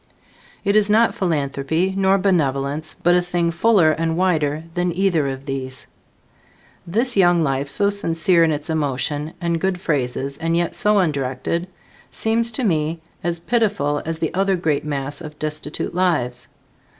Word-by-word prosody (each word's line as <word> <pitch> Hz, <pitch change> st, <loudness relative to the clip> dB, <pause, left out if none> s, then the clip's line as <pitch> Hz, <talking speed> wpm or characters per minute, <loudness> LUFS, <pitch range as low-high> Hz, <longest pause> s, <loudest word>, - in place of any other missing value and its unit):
It 200 Hz, +1 st, +2 dB
is 210 Hz, -1 st, +4 dB
not 225 Hz, +2 st, +4 dB
philanthropy 160 Hz, +1 st, -1 dB
nor 195 Hz, 0 st, +3 dB
benevolence, 155 Hz, -5 st, 0 dB
but 175 Hz, -, +5 dB
a 180 Hz, -, +4 dB
thing 175 Hz, -1 st, -1 dB
fuller 175 Hz, -2 st, +4 dB
and 165 Hz, +1 st, -1 dB
wider 160 Hz, -5 st, +1 dB
than 175 Hz, 0 st, 0 dB
either 175 Hz, -5 st, +1 dB
of 135 Hz, 0 st, -5 dB
these. 130 Hz, -2 st, -4 dB, 1.0 s
This 235 Hz, +8 st, +1 dB
young 175 Hz, -3 st, +4 dB
life, 135 Hz, -1 st, -1 dB
so 200 Hz, +6 st, +2 dB
sincere 170 Hz, -3 st, +3 dB
in 160 Hz, -, +3 dB
its 150 Hz, 0 st, -3 dB
emotion 150 Hz, 0 st, -2 dB
and 170 Hz, -2 st, -1 dB
good 190 Hz, -1 st, 0 dB
phrases 140 Hz, -3 st, -2 dB
and 165 Hz, +1 st, 0 dB
yet 170 Hz, -1 st, 0 dB
so 210 Hz, -2 st, +2 dB
undirected, 150 Hz, 0 st, -1 dB, 0.4 s
seems 230 Hz, +1 st, 0 dB
to 255 Hz, -, -2 dB
me 160 Hz, -4 st, 0 dB, 0.2 s
as 170 Hz, 0 st, -1 dB
pitiful 185 Hz, -8 st, 0 dB
as 165 Hz, 0 st, -4 dB
the 160 Hz, -1 st, -2 dB
other 195 Hz, +1 st, +2 dB
great 160 Hz, -5 st, 0 dB
mass 145 Hz, 0 st, -3 dB
of 150 Hz, -2 st, -9 dB
destitute 155 Hz, 0 st, -3 dB
lives. 150 Hz, -10 st, 0 dB
165 Hz, 155 wpm, -21 LUFS, 145-185 Hz, 1.0 s, but